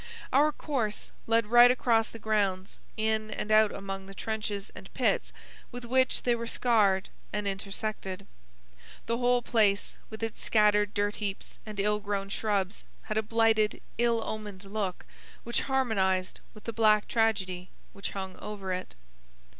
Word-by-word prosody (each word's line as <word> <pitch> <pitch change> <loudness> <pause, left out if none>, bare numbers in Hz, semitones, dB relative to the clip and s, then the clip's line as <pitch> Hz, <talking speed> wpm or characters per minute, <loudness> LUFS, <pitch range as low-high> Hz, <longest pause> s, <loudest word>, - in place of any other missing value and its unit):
Our 295 +3 +5
course 250 -9 -3 0.2
led 230 0 +3
right 240 +3 +8
across 235 -3 +2
the - - -9
grounds, 200 -4 -1 0.2
in 220 0 0
and 215 0 -4
out 215 -1 +6
among 195 -1 -6
the 195 - -11
trenches 210 -2 -4
and - - -11
pits - - +1 0.4
with 245 0 -7
which 260 +2 +2
they 245 - +3
were 235 0 -3
scarred 210 -6 +2 0.2
and 210 -1 -2
intersected. 195 -1 -4 0.8
The 230 +1 -1
whole 245 0 +3
place, 210 -4 +2
with 220 0 -7
its 225 -1 -3
scattered 210 -1 +3
dirt 205 0 0
heaps 200 -2 -5
and 210 -2 -6
ill 210 +1 +2
grown 200 -1 -3
shrubs, 200 -2 -1 0.2
had 215 - -3
a - - +2
blighted, 220 -1 +2 0.2
ill 235 -1 +2
omened 210 -3 -6
look 195 -2 -3 0.4
which 235 - -1
harmonized 195 -8 +1 0.2
with 215 - -13
the 230 - -4
black 215 -1 +4
tragedy 190 -5 0 0.2
which 200 - -4
hung 190 -1 -5
over 195 -3 -5
it. 185 - -5
215 Hz, 155 wpm, -29 LUFS, 195-225 Hz, 0.8 s, right